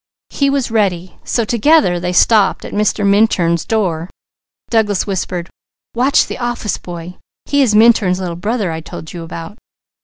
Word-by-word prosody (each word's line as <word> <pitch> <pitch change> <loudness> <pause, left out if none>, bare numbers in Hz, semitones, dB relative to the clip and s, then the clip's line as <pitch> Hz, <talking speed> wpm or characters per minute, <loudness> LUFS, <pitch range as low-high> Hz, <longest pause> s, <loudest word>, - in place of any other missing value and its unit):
He 280 -1 +1
was 275 -4 -1
ready, 185 -5 -1
so 235 - -1
together 235 - +3
they 180 +1 -2
stopped 205 +2 +3
at - - -8
Mr. 210 0 0
Minturn's 195 -5 +2
door. 180 -6 -1 0.6
Douglas 210 -4 +1
whispered: 185 -3 -3 0.5
"Watch 255 +4 +3
the - - -7
office 240 -4 -3
boy. 175 0 -9 0.3
He 285 0 +1
is 230 -6 +2
Minturn's 210 -5 +4
Little 175 -3 -4
Brother 205 +1 -2
I 160 0 -5
told 160 0 -9
you 175 - -7
about." 165 +5 -8
205 Hz, 155 wpm, -16 LUFS, 175-230 Hz, 0.6 s, Minturn's